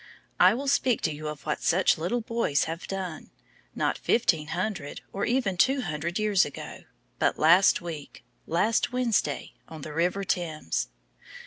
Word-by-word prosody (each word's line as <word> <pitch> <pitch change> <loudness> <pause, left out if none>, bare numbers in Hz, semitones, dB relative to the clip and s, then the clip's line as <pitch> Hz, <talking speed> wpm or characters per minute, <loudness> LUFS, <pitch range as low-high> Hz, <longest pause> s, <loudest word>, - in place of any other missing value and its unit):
I 185 +4 +6
will 275 +3 -4
speak 260 -3 +2
to 160 - 0
you 155 +1 -6
of 150 -1 -7
what 150 - -2
such 185 +3 +3
little 225 +9 -1
boys 230 -11 0
have 165 +1 -5
done, 185 -4 -5 0.5
not - - 0
fifteen 160 -9 +2
hundred, 175 -4 -3
or 200 - -1
even 235 -7 0
two 265 +7 +3
hundred 165 -2 -3
years 210 -3 +3
ago, 145 - -8 0.3
but - - +2
last 175 +6 +5
week 160 -7 -8 0.2
last 205 +7 +1
Wednesday, 250 -3 0
on 160 -2 -9
the 150 - -7
river 180 +5 0
Thames. 155 - -2
180 Hz, 155 wpm, -27 LUFS, 155-215 Hz, 0.5 s, I